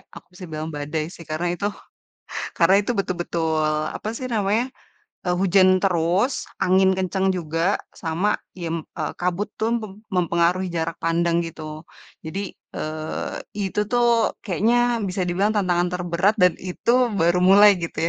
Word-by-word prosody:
aku -, -, -13 dB
bisa 180 Hz, +1 st, -10 dB
bilang 155 Hz, +1 st, -5 dB
badai 155 Hz, +3 st, -3 dB
sih -, -, -13 dB
karena 170 Hz, +3 st, -1 dB
itu 190 Hz, +4 st, -1 dB, 0.9 s
karena 170 Hz, +3 st, +5 dB
itu 210 Hz, -, -3 dB
betul 185 Hz, -2 st, 0 dB
betul 160 Hz, -2 st, -1 dB, 0.3 s
apa 215 Hz, -, -6 dB
sih 255 Hz, -, -4 dB
namanya, 220 Hz, 0 st, +1 dB, 0.6 s
eee, 180 Hz, 0 st, +1 dB
hujan 185 Hz, 0 st, +5 dB
terus, 185 Hz, +7 st, +1 dB
angin 190 Hz, +1 st, +4 dB
kencang 190 Hz, +1 st, 0 dB
juga 165 Hz, +4 st, 0 dB, 0.2 s
sama 175 Hz, +5 st, 0 dB, 0.2 s
yem 165 Hz, -2 st, -3 dB, 0.2 s
eee, 155 Hz, -, -2 dB
kabut 180 Hz, +3 st, 0 dB, 0.2 s
tuh 225 Hz, +1 st, +2 dB
pem 215 Hz, -3 st, -7 dB, 0.2 s
mempengaruhi 175 Hz, +1 st, +2 dB
jarak 165 Hz, 0 st, -2 dB
pandang 170 Hz, 0 st, +1 dB
gitu. 155 Hz, -1 st, -8 dB, 0.4 s
Jadi, 195 Hz, +5 st, -5 dB, 0.2 s
eee, 155 Hz, 0 st, -4 dB, 0.3 s
itu 195 Hz, +1 st, -2 dB
tuh 240 Hz, -2 st, +3 dB
kayaknya 230 Hz, +3 st, +1 dB
bisa 185 Hz, 0 st, -2 dB
dibilang 195 Hz, +5 st, +1 dB
tantangan 180 Hz, -4 st, +2 dB, 0.2 s
terberat 175 Hz, +4 st, +2 dB
dan 180 Hz, -2 st, +6 dB
itu 185 Hz, +5 st, -2 dB, 0.2 s
baru 175 Hz, -2 st, +2 dB
mulai 200 Hz, +1 st, +7 dB
gitu 170 Hz, -1 st, -6 dB
180 Hz, 145 wpm, -23 LUFS, 165-200 Hz, 0.9 s, mulai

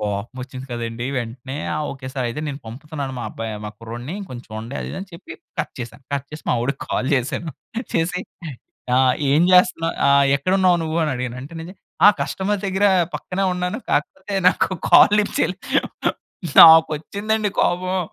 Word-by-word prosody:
కోపమొచ్చింది 125 Hz, +6 st, -5 dB
కదండీ. 120 Hz, +1 st, -4 dB
వెంటనే 125 Hz, +3 st, -6 dB, 0.2 s
"ఆ! -, -, -2 dB
Okay 130 Hz, -1 st, -8 dB
sir. 130 Hz, -2 st, -2 dB
అయితే, 150 Hz, -, -5 dB
నేను 140 Hz, 0 st, -5 dB
పంపుతున్నాను 140 Hz, +3 st, -6 dB
మా -, -, -4 dB
అబ్బాయి 115 Hz, -1 st, -5 dB
మా -, -, -5 dB
కుర్రోడిని, 120 Hz, -, -7 dB
కొంచూడండి" 115 Hz, 0 st, -8 dB
అది -, -, -5 dB
ఇది -, -, -5 dB
అని 195 Hz, -, -8 dB
చెప్పి 170 Hz, -, -10 dB, 0.3 s
కట్ -, -, -5 dB
చేశా. 120 Hz, 0 st, -7 dB, 0.2 s
కట్ 140 Hz, 0 st, -3 dB
చేసి, 150 Hz, -, -9 dB
మావోడికి 125 Hz, +3 st, -1 dB
కాల్ 130 Hz, -, 0 dB
చేశాను. 140 Hz, +5 st, -2 dB, 0.4 s
చేసి, 175 Hz, +2 st, 0 dB, 0.8 s
"ఆ! -, -, +5 dB, 0.3 s
ఏం 155 Hz, +4 st, +4 dB
చేస్తన్నా 165 Hz, -2 st, +4 dB, 0.2 s
ఆహ్, 140 Hz, 0 st, +5 dB
ఎక్కడున్నావు 185 Hz, +3 st, +2 dB
నువ్వు" 160 Hz, +1 st, -2 dB
అని 150 Hz, -, -1 dB
అడిగాను. 125 Hz, 0 st, -4 dB
అంటే 150 Hz, +5 st, -10 dB
నేజె 175 Hz, +4 st, -9 dB, 0.3 s
"ఆ! -, -, +11 dB
కస్టమర్ 195 Hz, +1 st, -1 dB
దగ్గరా 195 Hz, +1 st, +3 dB, 0.3 s
పక్కనే 190 Hz, +1 st, -3 dB
ఉన్నాను. 180 Hz, +5 st, -2 dB
కాకపోతే 190 Hz, +6 st, -2 dB
నాకు -, -, +1 dB, 0.2 s
కాల్ 205 Hz, -, +8 dB
లిఫ్ట్ 205 Hz, -, -3 dB
చేయలేదు." 185 Hz, +1 st, -1 dB, 0.5 s
నాకొచ్చిందండి 185 Hz, +7 st, +5 dB
కోపం. 185 Hz, +1 st, 0 dB
150 Hz, 160 wpm, -21 LUFS, 125-180 Hz, 0.8 s, ఆ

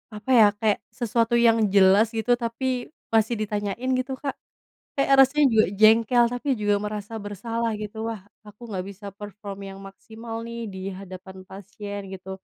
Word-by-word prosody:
apa 210 Hz, +4 st, -9 dB
ya 220 Hz, -, +9 dB
kayak 215 Hz, -3 st, +2 dB, 0.2 s
sesuatu 235 Hz, 0 st, +1 dB
yang 230 Hz, -1 st, +5 dB, 0.2 s
jelas 195 Hz, +3 st, +6 dB
gitu 225 Hz, +2 st, 0 dB
tapi 230 Hz, +3 st, -3 dB, 0.5 s
masih 225 Hz, +1 st, +3 dB
ditanyain 210 Hz, +3 st, -3 dB
gitu 260 Hz, +1 st, -3 dB
Kak. 275 Hz, -2 st, -2 dB, 0.6 s
Kayak 275 Hz, 0 st, +3 dB
rasanya 290 Hz, +3 st, +2 dB
juga 220 Hz, -1 st, +5 dB
jengkel 225 Hz, +2 st, +6 dB
tapi 245 Hz, +4 st, -6 dB
juga 205 Hz, -1 st, +2 dB
merasa 210 Hz, +1 st, -5 dB
bersalah 230 Hz, +3 st, -3 dB
gitu, 210 Hz, +1 st, -7 dB
"Wah 220 Hz, -3 st, -7 dB, 0.3 s
aku 210 Hz, +2 st, -15 dB
nggak 190 Hz, -3 st, -3 dB
bisa 200 Hz, +1 st, -12 dB
perform 205 Hz, -1 st, -8 dB
yang 195 Hz, 0 st, -10 dB
maksimal 225 Hz, +3 st, -10 dB
nih 235 Hz, 0 st, -6 dB
di 190 Hz, -, -7 dB, 0.2 s
hadapan 190 Hz, 0 st, -10 dB
pasien," 200 Hz, +1 st, -8 dB
gitu, 190 Hz, 0 st, -10 dB
215 Hz, 160 wpm, -24 LUFS, 200-230 Hz, 0.6 s, ya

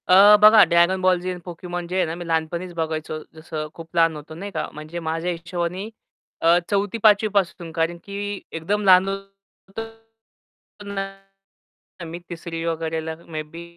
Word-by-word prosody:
अ, 200 Hz, +3 st, +8 dB
बघा 215 Hz, 0 st, +9 dB
Dragon 170 Hz, +2 st, +4 dB
Ball 185 Hz, -1 st, +4 dB
Z 180 Hz, -, -6 dB
आणि 180 Hz, -, -6 dB
Pokémon 175 Hz, 0 st, -5 dB
जे 180 Hz, -, -4 dB
आहे 185 Hz, -, +3 dB
ना 160 Hz, 0 st, -4 dB
मी 175 Hz, 0 st, -7 dB
लहानपणीच 170 Hz, +2 st, -2 dB
बघायचो 160 Hz, -1 st, -3 dB, 0.2 s
जसं 155 Hz, -1 st, -5 dB
खूप 165 Hz, +1 st, -12 dB
लहान 165 Hz, -1 st, +4 dB
होतो 150 Hz, +1 st, -9 dB
नाही 200 Hz, +5 st, -6 dB
का? 155 Hz, -4 st, -3 dB
म्हणजे 155 Hz, +3 st, -7 dB
माझ्या 165 Hz, +2 st, -2 dB
हिशोबानी 175 Hz, +3 st, -4 dB, 0.5 s
अ, 165 Hz, +1 st, +5 dB
4थी 205 Hz, +2 st, 0 dB
5वी 215 Hz, -1 st, +5 dB
पासून 175 Hz, -4 st, 0 dB
कारण 165 Hz, +1 st, -1 dB
की 205 Hz, 0 st, -5 dB
एकदम 195 Hz, +6 st, -1 dB
लहान 185 Hz, 0 st, +7 dB
होतो 195 Hz, +1 st, -9 dB, 1.1 s
ना 195 Hz, 0 st, -8 dB, 0.5 s
मी 165 Hz, +1 st, -7 dB
3री 165 Hz, -1 st, -5 dB
वगैरेला 160 Hz, -1 st, -2 dB
मे 155 Hz, -2 st, -4 dB
बी 165 Hz, +3 st, -10 dB
175 Hz, 160 wpm, -23 LUFS, 165-195 Hz, 1.1 s, बघा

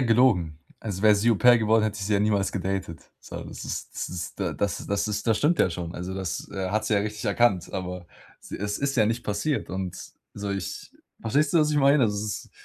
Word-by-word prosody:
gelogen. 110 Hz, -, +3 dB, 0.2 s
Also, 100 Hz, -4 st, -4 dB
wäre 105 Hz, -1 st, +7 dB
sie 105 Hz, +4 st, +2 dB
Au-Pair 120 Hz, +3 st, +6 dB
geworden, 110 Hz, 0 st, +3 dB
hätte 110 Hz, -1 st, -1 dB
ich 100 Hz, -, -3 dB
sie 105 Hz, -, -1 dB
ja 100 Hz, -, +3 dB
niemals 105 Hz, -2 st, +1 dB
gedatet. 95 Hz, -3 st, -4 dB
So -, -, -8 dB
das -, -, -8 dB
ist -, -, -5 dB
das -, -, -3 dB
ist 90 Hz, -1 st, -6 dB
d 95 Hz, -5 st, -1 dB
das 100 Hz, -3 st, -2 dB
das 100 Hz, +1 st, 0 dB
ist 105 Hz, +1 st, -3 dB
das 110 Hz, -2 st, +3 dB
stimmt 160 Hz, +3 st, +2 dB
ja 90 Hz, -, +3 dB
schon. 85 Hz, 0 st, -5 dB
Also, 90 Hz, +1 st, -5 dB
das, 95 Hz, -3 st, -4 dB
äh, 95 Hz, -2 st, -3 dB
hat 110 Hz, +2 st, 0 dB
sie 110 Hz, -, -1 dB
ja 100 Hz, -, +4 dB
richtig 105 Hz, +2 st, -4 dB
erkannt. 100 Hz, -4 st, +2 dB
Aber 90 Hz, -2 st, -5 dB, 0.4 s
s -, -, -14 dB
es 105 Hz, +1 st, -2 dB
ist 140 Hz, 0 st, -1 dB
ja 110 Hz, -3 st, +4 dB
nicht 115 Hz, +2 st, -2 dB
passiert. 105 Hz, +9 st, -1 dB
Und 95 Hz, -1 st, -4 dB, 0.4 s
so 100 Hz, 0 st, -4 dB
ich 95 Hz, -2 st, -5 dB, 0.3 s
verstehst 140 Hz, +7 st, +1 dB
du, -, -, +6 dB
was 150 Hz, -1 st, +3 dB
ich 150 Hz, -, +2 dB
meine? 140 Hz, 0 st, +5 dB
Also, 105 Hz, -3 st, +2 dB
es 105 Hz, -, -2 dB, 0.2 s
ist -, -, -22 dB
105 Hz, 240 wpm, -26 LUFS, 95-115 Hz, 0.4 s, wäre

